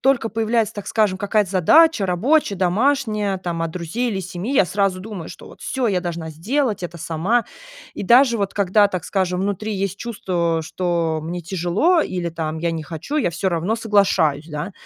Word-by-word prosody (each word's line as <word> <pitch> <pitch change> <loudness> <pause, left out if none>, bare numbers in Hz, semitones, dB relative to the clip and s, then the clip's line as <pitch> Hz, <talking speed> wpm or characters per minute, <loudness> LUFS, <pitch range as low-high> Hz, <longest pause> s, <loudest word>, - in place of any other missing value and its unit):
только 260 -4 +2
появляется, 225 0 0
так 205 - -7
скажем, 210 -4 +2
какая-то 205 -1 +1
задача 220 - +5
рабочая, 205 - +2
домашняя, 210 0 +1
там 170 -2 -3
от 165 - -2
друзей 180 +9 -3
или 195 - -2
семьи, 185 +6 -5
я 195 - +5
сразу 195 0 0
думаю, 195 -5 -7
что - - -11
вот - - -15
всё 260 -2 -2
я 185 -3 +1
должна 170 -2 -5
сделать 215 - -1
это 170 -1 -6
сама. 180 +10 0 0.5
И - - -5
даже 240 +4 +5
вот 200 -1 -1
когда, 200 +1 +3
так 185 -4 -4
скажем, 185 -2 -1
внутри 205 +2 -2
есть 195 -1 -2
чувство, 175 -8 -1
что 170 -1 -1
мне 175 +2 -4
тяжело 190 - +1
или 175 -2 -3
там 160 -1 -4
я 170 0 -1
не 160 - -4
хочу, 165 - -7
я 270 - +1
всё 190 +3 -1
равно 175 +6 -1
соглашаюсь, 190 -9 +2
да. 150 +6 -5
190 Hz, 185 wpm, -21 LUFS, 170-220 Hz, 0.5 s, задача